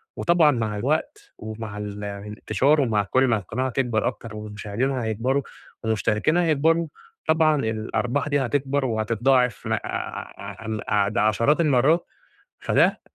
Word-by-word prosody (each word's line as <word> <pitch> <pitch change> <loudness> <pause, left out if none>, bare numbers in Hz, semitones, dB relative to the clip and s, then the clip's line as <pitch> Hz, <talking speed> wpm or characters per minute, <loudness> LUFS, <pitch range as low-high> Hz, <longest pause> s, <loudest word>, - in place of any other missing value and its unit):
وطبعًا 170 -3 +4
مع 110 -5 -2
الوقت 105 - -2
ومع 110 -1 -7
ال 105 0 -6
الإنتشار 105 +8 0
ومع 110 -6 +1
كُلّ 130 +6 +2
ما 115 -3 +3
القناة 120 +7 -3
تكبر 120 -4 0
أكتر 115 -2 -6
والمشاهدين 105 +4 -3
هيكبروا 125 +2 0 0.4
والمشتركين 110 - +1
هيكبروا، 165 0 +2 0.4
طبعًا 160 -1 +4
الأرباح 115 +5 -1
دي 145 -1 +2
هتكبر 135 +1 0
وهتتضاعف 115 +1 +1
ع - - +1 0.9
عم 110 -1 -3 0.3
د - - -3
عشرات 115 +9 +3
المرات، 150 +3 +3 0.6
فده - - +2
120 Hz, 125 wpm, -24 LUFS, 110-140 Hz, 0.9 s, وطبعًا